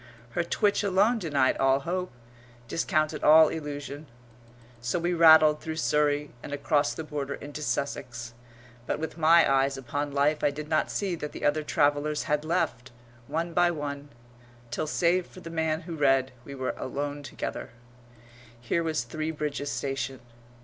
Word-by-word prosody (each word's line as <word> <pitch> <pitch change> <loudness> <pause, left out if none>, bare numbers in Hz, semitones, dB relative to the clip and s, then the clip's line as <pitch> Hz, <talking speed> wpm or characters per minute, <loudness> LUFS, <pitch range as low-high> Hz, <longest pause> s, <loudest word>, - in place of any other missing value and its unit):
Her 170 - 0
twitch 205 +4 +1
alone 205 +4 +2
denied 145 -8 +1
all 135 0 +3
hope, 180 +3 -3 0.6
discounted 155 - 0
all 155 +1 +8
illusion. 145 -1 -6 0.7
So 120 +6 -1
we 175 +1 0
rattled 160 -2 +7
through 160 0 -4
Surrey 150 -2 +1
and - - -8
across 145 +1 +1
the 160 - -5
border 145 -2 -4
into 145 +1 -8
Sussex. 120 -5 -3 0.5
But - - -1
with 160 +1 -6
my 165 +1 +6
eyes 135 0 +2
upon 145 +2 -3
life 145 +2 +1
I - - +4
did 150 +1 -6
not 155 - +1
see 195 -3 -2
that 150 -2 -6
the - - -5
other 145 +1 +2
travellers 150 0 +1
had 150 0 0
left, 140 -7 -1 0.4
one 165 +3 -2
by 175 +1 +4
one, 145 -3 -5 0.6
till, 155 +6 -2
save 175 +3 +1
for 185 - -13
the 165 -1 -8
man 160 -1 0
who 170 -1 -7
read, 135 -3 +2
we 140 - -8
were 130 -1 -2
alone 145 +2 -4
together. 140 - -6 0.9
Here 120 +8 -1
was 160 -6 -1
Three 155 +6 -4
Bridges 150 -2 -3
station. 135 -2 -3
150 Hz, 160 wpm, -27 LUFS, 140-160 Hz, 0.9 s, all